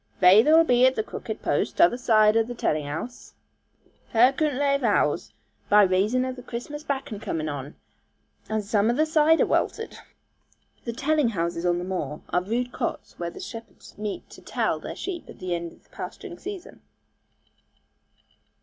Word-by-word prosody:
'Vayther'll 225 - +7
be 250 -5 +3
at 260 - +1
the 220 - 0
crooked 220 0 -7
post, - - 0
tother 180 - +5
zide 215 -3 +4
o' 225 - +4
telling 155 -9 -1
house.* 165 +12 -7 0.8
Her 245 +4 +6
coodn't 295 -2 0
lave 280 0 +2
'ouze - - +1 0.4
by 210 0 +7
raison 200 +7 +2
of 255 0 -4
the 250 - -9
Chirstmas 270 +6 -6
bakkon 270 -8 -4
comin' 155 -1 -3
on, 145 -1 -5 0.7
and 220 -1 -1
zome 205 +1 +2
o' - - +3
the 310 +3 +3
cider 315 +1 +4
welted.' 450 - -1 0.4
* - - -39
The 235 - -3
'telling 295 +1 +1
houses' 170 -3 -2
on 175 0 +2
the 175 - -3
moor 165 -6 -4
are 180 - +1
rude 240 +6 -2
cots - - -4
where 170 -1 -2
the - - -11
shepherds 225 -1 -10
meet 210 -1 -5
to - - -13
'tell' - - -1
their - - -7
sheep 360 -3 -6
at - - -11
the 185 -1 -3
end 170 -1 -3
of - - -21
the - - -32
pasturing 355 -4 -8
season. 395 -2 -8
225 Hz, 175 wpm, -25 LUFS, 185-275 Hz, 0.8 s, Vayther'll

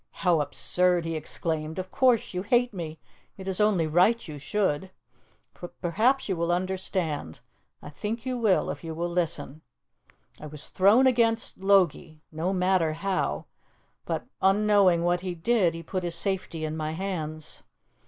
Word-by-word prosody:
"How 170 -4 +4
absurd!" 175 +4 +1
he 165 - -2
exclaimed. 155 +1 -3
"Of 185 0 -5
course 250 -6 +2
you 180 - -2
hate 240 +4 +2
me; 160 -4 -6 0.4
it 190 -1 -9
is 190 +1 -1
only 205 -6 +3
right 180 +9 +3
you 150 -2 -7
should. 190 0 -1 0.7
But 175 - -9
perhaps 225 +10 +1
you 190 - 0
will 170 0 0
understand 180 - -2 0.4
I 145 - -9
think 220 - -5
you 255 -1 -1
will, 220 -6 +2
if - - -8
you 160 -1 -5
will 170 +2 -2
listen. 160 -4 -2 0.8
I 150 - -8
was 150 0 -6
thrown 205 +8 +5
against 230 -5 +2
Logie 185 -5 +2
no 160 +4 -2
matter 180 -4 +2
how 185 +4 -2 0.6
but, - - -3 0.2
unknowing 195 -3 +4
what 175 0 +1
he 180 -1 -4
did, 180 -1 +2
he 165 - -7
put 185 +3 -3
his 175 -1 -3
safety 170 -3 -2
in 155 0 -4
my 155 0 -3
hands. 160 -4 -5
180 Hz, 160 wpm, -27 LUFS, 160-195 Hz, 0.8 s, thrown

